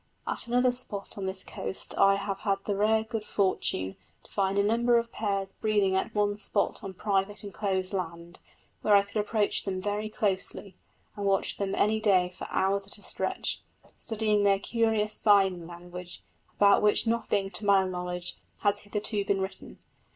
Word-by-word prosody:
At -, -, -3 dB
another 250 Hz, +1 st, +3 dB
spot 235 Hz, -5 st, -6 dB
on 195 Hz, -2 st, -4 dB
this 190 Hz, 0 st, -2 dB
coast -, -, -4 dB
I 195 Hz, 0 st, +5 dB
have 200 Hz, 0 st, -3 dB
had 200 Hz, -2 st, +1 dB
the 205 Hz, -, 0 dB
rare 220 Hz, +2 st, +3 dB
good 220 Hz, -1 st, -4 dB
fortune 185 Hz, -, 0 dB, 0.3 s
to -, -, -18 dB
find 195 Hz, -1 st, 0 dB
a 200 Hz, -, +4 dB
number 235 Hz, +3 st, +3 dB
of 235 Hz, 0 st, -1 dB
pairs 195 Hz, -3 st, -2 dB
breeding 205 Hz, -3 st, +1 dB
at 215 Hz, +3 st, -1 dB
one 205 Hz, 0 st, +1 dB
spot 200 Hz, 0 st, -1 dB
on 195 Hz, -1 st, -6 dB
private 200 Hz, +1 st, 0 dB
enclosed 195 Hz, -2 st, -2 dB
land, 170 Hz, -2 st, -5 dB, 0.4 s
where 210 Hz, -, +4 dB
I 200 Hz, -, +6 dB
could 200 Hz, +2 st, -7 dB
approach 210 Hz, 0 st, +1 dB
them 190 Hz, -2 st, -3 dB
very 210 Hz, +2 st, -2 dB
closely, 200 Hz, -2 st, -2 dB, 0.4 s
and 205 Hz, -1 st, -2 dB
watch 195 Hz, -1 st, +1 dB
them 195 Hz, -1 st, -2 dB
any 220 Hz, +1 st, +2 dB
day 185 Hz, -4 st, +3 dB
for -, -, -7 dB
hours 195 Hz, +1 st, 0 dB
at 200 Hz, -, 0 dB
a 205 Hz, -, -14 dB
stretch, -, -, -1 dB, 0.3 s
studying 215 Hz, -2 st, 0 dB
their 200 Hz, -1 st, +4 dB
curious 220 Hz, 0 st, 0 dB
sign 190 Hz, -5 st, +3 dB
language, 175 Hz, +1 st, -8 dB, 0.3 s
about 200 Hz, -1 st, +5 dB
which 210 Hz, +2 st, +3 dB
nothing, 210 Hz, -4 st, 0 dB
to 200 Hz, +3 st, +2 dB
my 195 Hz, -1 st, +6 dB
knowledge, 180 Hz, -1 st, -4 dB, 0.2 s
has 205 Hz, -1 st, +3 dB
hitherto 210 Hz, 0 st, -1 dB
been 195 Hz, -1 st, 0 dB
written. 190 Hz, 0 st, -6 dB
200 Hz, 175 wpm, -28 LUFS, 190-215 Hz, 0.4 s, I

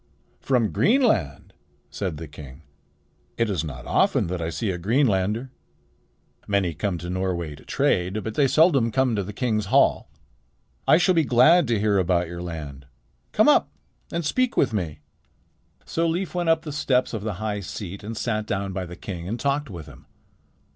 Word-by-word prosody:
"From 125 Hz, -5 st, +1 dB
Greenland!" 205 Hz, -, +1 dB, 0.4 s
said 95 Hz, -6 st, -3 dB
the 80 Hz, +1 st, -7 dB
king. 75 Hz, 0 st, -12 dB, 0.7 s
"It 115 Hz, -2 st, +1 dB
is 85 Hz, -5 st, -1 dB
not 65 Hz, -5 st, -7 dB
often -, -, +2 dB
that 90 Hz, -1 st, -3 dB
I 80 Hz, -, -2 dB
see 100 Hz, +5 st, -2 dB
a 90 Hz, -, -4 dB
Greenlander. 110 Hz, -, +1 dB, 1.0 s
Many 100 Hz, -4 st, +1 dB
come 90 Hz, +3 st, -2 dB
to 85 Hz, +1 st, -7 dB
Norway 90 Hz, -4 st, -2 dB
to 75 Hz, -, -14 dB
trade, 95 Hz, +4 st, 0 dB
but 110 Hz, -, -4 dB
they 140 Hz, +4 st, +3 dB
seldom 140 Hz, -6 st, +4 dB
come 130 Hz, 0 st, +1 dB
to 100 Hz, -, 0 dB
the 100 Hz, +2 st, -6 dB
king's 110 Hz, -2 st, -1 dB
hall. -, -, +3 dB, 0.8 s
I -, -, +7 dB
shall 180 Hz, +2 st, +3 dB
be 165 Hz, -2 st, +3 dB
glad 145 Hz, +6 st, +5 dB
to 115 Hz, -3 st, +1 dB
hear 105 Hz, -1 st, +2 dB
about 90 Hz, -1 st, +1 dB
your 85 Hz, +1 st, -7 dB
land. 75 Hz, -6 st, -7 dB, 0.4 s
Come -, -, +3 dB
up -, -, +5 dB, 0.4 s
and 170 Hz, -1 st, -2 dB
speak 255 Hz, +10 st, 0 dB
with -, -, +2 dB
me." 80 Hz, -7 st, -3 dB, 0.8 s
So 165 Hz, +1 st, 0 dB
Leif 175 Hz, +3 st, -2 dB
went 175 Hz, -2 st, 0 dB
up 165 Hz, 0 st, +3 dB
the 155 Hz, -, -6 dB
steps 130 Hz, -4 st, +1 dB
of 110 Hz, -, -3 dB
the 105 Hz, 0 st, -3 dB
high 105 Hz, +2 st, -3 dB
seat 100 Hz, 0 st, -7 dB
and 110 Hz, +1 st, -6 dB
sat 110 Hz, -2 st, -2 dB
down 100 Hz, -2 st, -2 dB
by 90 Hz, -1 st, -4 dB
the 90 Hz, -, -9 dB
king 85 Hz, -2 st, -7 dB
and 115 Hz, +5 st, -3 dB
talked 140 Hz, +2 st, -1 dB
with 85 Hz, -6 st, -8 dB
him. -, -, -15 dB
105 Hz, 180 wpm, -24 LUFS, 90-130 Hz, 1.0 s, I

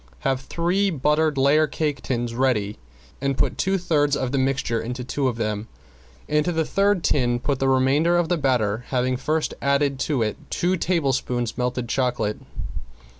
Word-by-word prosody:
Have 135 Hz, -1 st, 0 dB
three 175 Hz, +7 st, 0 dB
buttered 150 Hz, -1 st, +1 dB
layer 145 Hz, +3 st, +4 dB
cake 145 Hz, -2 st, -2 dB
tins 120 Hz, -2 st, -2 dB
ready 115 Hz, -5 st, 0 dB, 0.4 s
and 140 Hz, -1 st, 0 dB
put -, -, 0 dB
two 195 Hz, +1 st, +2 dB
thirds 145 Hz, -5 st, +1 dB
of 130 Hz, -1 st, -2 dB
the 135 Hz, -, +1 dB
mixture 130 Hz, -3 st, 0 dB
into 125 Hz, +2 st, -5 dB
two 135 Hz, +2 st, -1 dB
of 120 Hz, -3 st, -2 dB
them, 110 Hz, -1 st, -2 dB, 0.6 s
into 150 Hz, +3 st, +1 dB
the 160 Hz, -1 st, 0 dB
third 200 Hz, -1 st, +2 dB
tin 120 Hz, -3 st, +2 dB
put 135 Hz, +2 st, -1 dB
the 135 Hz, -, +2 dB
remainder 140 Hz, +6 st, +3 dB
of 175 Hz, -1 st, +1 dB
the 175 Hz, -, +1 dB
batter, 125 Hz, -6 st, +1 dB
having 130 Hz, 0 st, 0 dB
first 155 Hz, +4 st, -1 dB
added 140 Hz, -1 st, +1 dB
to 140 Hz, -6 st, 0 dB
it 105 Hz, -1 st, -2 dB
two 180 Hz, +2 st, +1 dB
tablespoons 135 Hz, -9 st, 0 dB
melted 125 Hz, -1 st, -2 dB
chocolate. 125 Hz, -4 st, -1 dB
135 Hz, 170 wpm, -23 LUFS, 125-155 Hz, 0.6 s, layer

